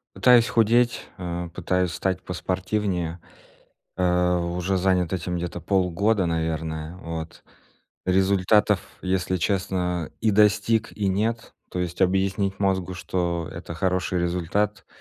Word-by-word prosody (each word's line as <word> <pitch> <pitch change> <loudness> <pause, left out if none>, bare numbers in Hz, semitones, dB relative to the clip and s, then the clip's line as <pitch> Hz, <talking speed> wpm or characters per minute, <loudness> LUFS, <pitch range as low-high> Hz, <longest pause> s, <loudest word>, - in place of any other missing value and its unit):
Пытаюсь 120 -2 +6
худеть, 120 +1 +2
а, 90 -1 -4
пытаюсь 90 +1 -1
стать 95 +2 -1
поспортивнее. 90 -1 -2 0.8
Э, 90 0 +2
уже 90 +2 -1
занят 90 -2 +1
этим 90 -1 -2
где-то 90 0 -4
полгода, 95 +3 +1
наверное, 80 0 -2
вот. 80 -2 -7 0.6
Результатов, 95 +2 +3 0.2
если 95 0 0
честно, 90 -3 -1
и 110 - +3
достиг, 105 +2 +3
и 105 - -1
нет, 110 +4 -1 0.2
то 90 - -4
есть 90 +1 -2
объяснить 95 +1 +1
мозгу, 95 -2 0
что 85 -2 -2
это 85 - -7
хороший 90 +1 0
результат, 90 +4 -1
90 Hz, 115 wpm, -24 LUFS, 85-100 Hz, 0.8 s, Пытаюсь